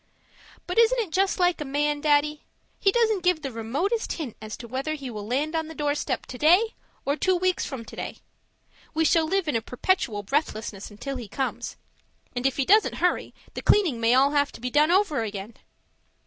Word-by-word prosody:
But 360 +5 0
isn't 465 +2 +5
it 435 -8 -1
just 385 +3 +1
like 355 -3 +2
a - - 0
man, 295 +1 0
Daddy? 300 0 +2 0.4
He 390 - +4
doesn't 445 -3 +2
give 355 -3 +1
the 270 - -3
remotest 275 - -1
hint 290 -9 -5
as 215 0 -7
to 235 - -9
whether 270 +6 -2
he 275 -4 -7
will 210 -2 -6
land 290 +7 -1
on 320 -1 -1
the 320 - -9
doorstep 290 -2 -1
today, 345 - +3 0.3
or 280 - +1
two 370 +4 +2
weeks 370 0 0
from 255 -5 -6
today. - - -6 0.8
We 320 0 +2
shall 325 0 +4
live 385 0 0
in 295 - 0
a 225 - +1
perpetual 235 - -1
breathlessness 215 -5 -2
until 265 +6 -6
he 240 -3 -7
comes 265 +6 -3 0.6
and 245 +2 +1
if 270 - -2
he 275 - +1
doesn't 425 +7 +4
hurry, 360 - 0 0.2
the - - -5
cleaning 340 - +3
may 230 +2 +4
all 275 +2 +5
have 285 -1 +2
to - - -10
be 250 +1 -4
done 300 +3 +4
over 355 - +3
again. 210 0 -5
295 Hz, 200 wpm, -26 LUFS, 250-360 Hz, 0.8 s, isn't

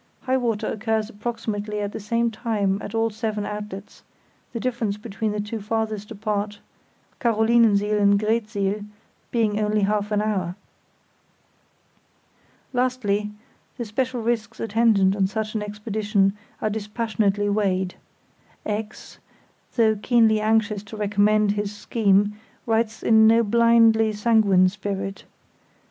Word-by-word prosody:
High 260 0 +1
water 230 -4 -1
occurs 220 +1 -1
approximately 210 -1 -4
at 205 0 -3
the - - -6
same 230 +3 0
time 210 -4 -1
at 210 - -6
all 225 0 +1
seven 215 -1 -3
outlets, 210 -1 -7 0.5
the 230 - -4
difference 230 -4 -2
between 215 0 -3
the 210 - -3
two 210 +1 -4
farthest 215 -1 -2
apart, 210 -1 -3 0.6
Carolinensiel 220 -3 +3
and 200 0 +4
Greetsiel, 210 -2 -1 0.5
being 215 -3 +1
only 210 0 +1
half 205 +1 0
an 210 - +2
hour. 185 -5 -1 2.2
Lastly, 245 -5 0 0.5
the 240 - -3
special 245 +2 -2
risks 230 -1 -2
attendant 215 -3 +3
on 195 -2 +2
such 215 +1 -3
an 215 - -2
expedition 210 -1 0 0.3
are 215 - +2
dispassionately 210 -1 -1
weighed. 190 -3 0 0.7
X——, 210 0 -5 0.6
though 220 -2 +4
keenly 220 0 +3
anxious 215 -1 +1
to 210 +2 -10
recommend 210 0 +2
his 205 0 -3
scheme, 205 -1 +1 0.3
writes 225 -1 0
in 220 -1 +6
no 230 +1 +5
blindly 230 0 +4
sanguine 210 -4 +4
spirit. 195 0 -4
215 Hz, 125 wpm, -23 LUFS, 205-225 Hz, 2.2 s, in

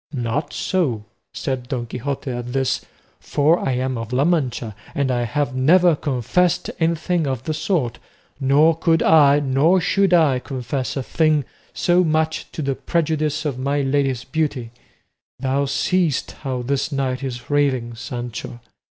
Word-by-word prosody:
"Not 135 +4 -2
so," 135 - -1 0.3
said 130 -2 -4
Don 125 -4 -2
Quixote 130 +3 -4
at 120 0 -5
this, 135 -1 0 0.4
"for 155 +4 +2
I 135 - -1
am 130 -1 -1
of 115 0 -6
La 130 +3 +2
Mancha, 125 - 0 0.2
and 140 -2 +1
I 120 -1 0
have 145 +3 -1
never 170 +6 +5
confessed 145 +6 0
anything 165 0 0
of 130 -2 -2
the 155 - -2
sort, 150 - -1 0.4
nor 145 +4 +4
could 165 0 +2
I 145 -2 +6
nor 145 +7 +3
should 195 +2 +2
I 155 -7 +4
confess 130 0 -4
a 135 - -2
thing 155 -1 +1 0.3
so 175 +1 +2
much 160 -1 0
to 155 - -4
the 135 0 0
prejudice 155 0 -1
of 135 -4 -2
my 140 +2 0
lady's 135 -2 0
beauty; 145 -7 -2 0.7
thou 135 +2 0
seest 160 +2 0
how 130 -3 -4
this 140 +4 -1
knight 135 -1 -2
is 125 0 -6
raving, 130 -5 +1
Sancho. 120 0 -6
140 Hz, 150 wpm, -21 LUFS, 125-155 Hz, 0.7 s, I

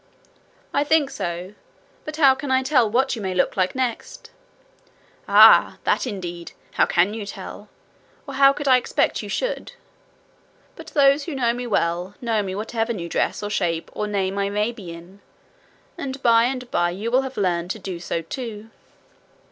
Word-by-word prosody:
'I 285 - +2
think 300 -2 +3
so. 175 +3 -5 0.5
But 310 - -5
how 275 -4 +6
can 265 +1 -6
I 260 0 +2
tell 260 -5 +3
what 260 +4 +1
you 225 - -7
may 190 -2 -3
look 180 - +1
like 185 +3 0
next?' 255 -3 -4 1.0
'Ah, - - +7
that - - +1
indeed! 175 -5 -6 0.2
How - - +2
can 180 +4 +2
you 220 -1 -5
tell? 200 - -9 0.6
Or 275 - -6
how 275 0 +6
could 290 +1 -5
I 255 -1 +7
expect 250 - 0
you - - -8
should? - - -3 1.0
But - - -11
those 280 -1 +3
who 325 - -5
know 240 -3 +1
me 245 0 -5
well, 180 -2 -1
know 225 -3 0
me 190 -2 -4
whatever 225 +2 -2
new 170 -5 -6
dress - - -1
or 205 - -4
shape 170 -5 -1
or 210 - -3
name 195 -1 -1
I 200 0 0
may 210 +3 0
be 200 -8 -10
in; 175 +4 -13 0.8
and 270 0 -5
by 230 -1 +5
and 250 -1 -4
by 175 0 +1
you 205 +6 -4
will 255 +2 +4
have 265 -1 -7
learned 175 -3 0
to 210 - -3
do 185 -4 -6
so 170 -1 -3
too.' 225 +2 -7
220 Hz, 180 wpm, -22 LUFS, 185-260 Hz, 1.0 s, Ah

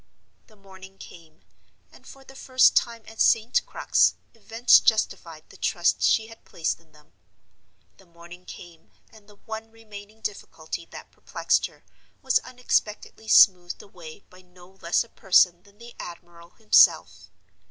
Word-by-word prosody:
The 215 - -22
morning 195 -1 -16
came, 165 -4 -16 0.5
and - - -20
for 270 - -15
the 270 0 -17
first 255 -1 +2
time 230 -2 -1
at 220 0 -8
St. 230 - +2
Crux - - +1 0.2
events 225 +2 +3
justified 165 -7 -1
the - - -17
trust 175 -1 0
she 220 - +2
had 225 0 -16
placed 165 -1 -4
in 165 -2 -28
them. 150 0 -24 0.8
The 190 - -22
morning 170 +1 -15
came, 170 -3 -14 0.2
and 215 -2 -20
the 205 - -18
one 220 +2 -9
remaining 215 -1 -14
difficulty 170 -5 -7
that - - -13
perplexed - - -2
her - - -24 0.4
was 260 -2 +2
unexpectedly 220 -3 -4
smoothed 180 -5 +4
away 175 -3 -13
by 185 0 -17
no 180 0 -20
less 170 +6 0
a 235 - -21
person 180 -3 +2
than 200 +1 -25
the 235 +1 -14
admiral 170 -1 -12
himself! 215 +3 +2
200 Hz, 150 wpm, -24 LUFS, 175-225 Hz, 0.8 s, smoothed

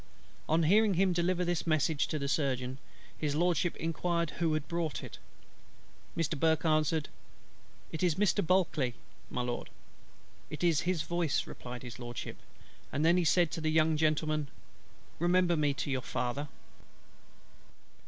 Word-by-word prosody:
On 160 +2 +3
hearing 205 +4 +4
him 185 +1 +3
deliver 180 +1 +1
this 175 -1 -1
message 155 -1 +2
to 155 - -2
the 140 -1 -2
Surgeon, 130 -2 -1 0.4
His 145 -2 -2
LORDSHIP 175 +1 +1
inquired 170 0 -1
who 165 -2 +2
had 150 -2 -3
brought 170 -3 -2
it. - - -9 1.0
Mr. 165 -1 0
BURKE 160 +1 +2
answered, 155 -1 +2 0.8
"It 160 - -4
is 175 -4 +2
Mr. 205 +1 +2
BULKLEY, 165 -9 +1 0.3
my 125 - -2
Lord." 120 0 -3 0.8
"It 150 +1 -6
is 165 -4 +3
his 175 -4 0
voice," 175 -4 0
replied 125 0 -8
His 125 -1 -8
LORDSHIP: 120 -2 -6 0.5
he - - -3
then 170 +4 +4
said 170 0 +3
to 165 - -4
the 155 - +1
young 155 0 +3
gentleman, 155 -1 +1 0.7
"Remember 175 +1 +3
me 150 -2 +2
to 140 - -3
your 130 -1 0
father." 125 +5 -2
160 Hz, 145 wpm, -31 LUFS, 145-175 Hz, 1.0 s, hearing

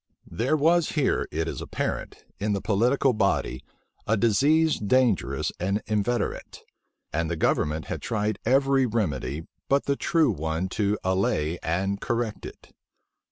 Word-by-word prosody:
There 130 +7 +1
was 165 +3 +3
here, 150 -4 +1
it 80 +1 -2
is - - -4
apparent, - - -4
in 105 +1 0
the 100 - 0
political 125 +6 +2
body, 70 - 0 0.4
a 110 - +2
disease 145 +9 +3
dangerous 120 0 +1
and 100 +4 -1
inveterate; 110 +3 -2 0.5
and 80 +1 0
the 85 - -1
government 75 0 0
had - - -5
tried 105 -1 -1
every 135 +1 +3
remedy 80 - -2 0.2
but 140 +1 +3
the 140 - +1
true 160 +1 +2
one 80 +4 -2
to 105 +1 0
allay 95 -4 0
and 95 +4 -1
correct 115 -2 -2
it. - - -14
105 Hz, 140 wpm, -26 LUFS, 90-130 Hz, 0.5 s, was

